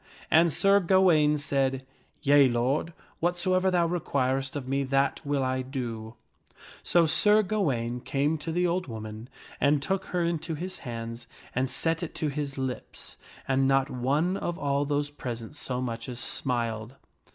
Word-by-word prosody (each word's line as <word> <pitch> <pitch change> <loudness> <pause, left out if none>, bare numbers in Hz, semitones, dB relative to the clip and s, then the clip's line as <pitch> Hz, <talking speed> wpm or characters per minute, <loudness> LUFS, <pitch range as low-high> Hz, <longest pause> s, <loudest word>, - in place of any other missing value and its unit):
And 165 +1 +5
Sir 195 +5 +4
Gawaine 170 -5 +4
said, 135 -2 -1 0.4
"Yea, 140 -1 +6
lord, 130 +7 0 0.3
whatsoever 185 +2 +1
thou 175 -2 +2
requirest 135 -6 -1
of 135 -3 -4
me, 140 +1 0
that 135 +2 +1
will 140 -2 0
I 130 0 0
do." 120 -4 -5 0.7
So 170 -1 +3
Sir 210 +7 +5
Gawaine 135 - -1
came 145 +5 0
to 160 +2 -4
the 175 +2 +1
old 180 0 0
woman 110 0 -7 0.3
and 145 +1 +3
took 190 +7 -2
her 180 - -2
hand 170 - +1
into 160 +1 -5
his 185 +4 -6
and 115 +2 -5
set 165 +4 0
it 170 - -5
to 155 - -1
his 140 -1 -4
lips; 130 -2 -6 0.3
and 135 0 +2
not 135 0 +2
one 145 +9 0
of 175 -3 -3
all 140 0 0
those 145 0 -1
present 120 -5 -6
so 130 -4 -3
much 115 -1 -4
as 120 -1 -5
smiled. 115 -2 -1
140 Hz, 160 wpm, -27 LUFS, 130-165 Hz, 0.7 s, Yea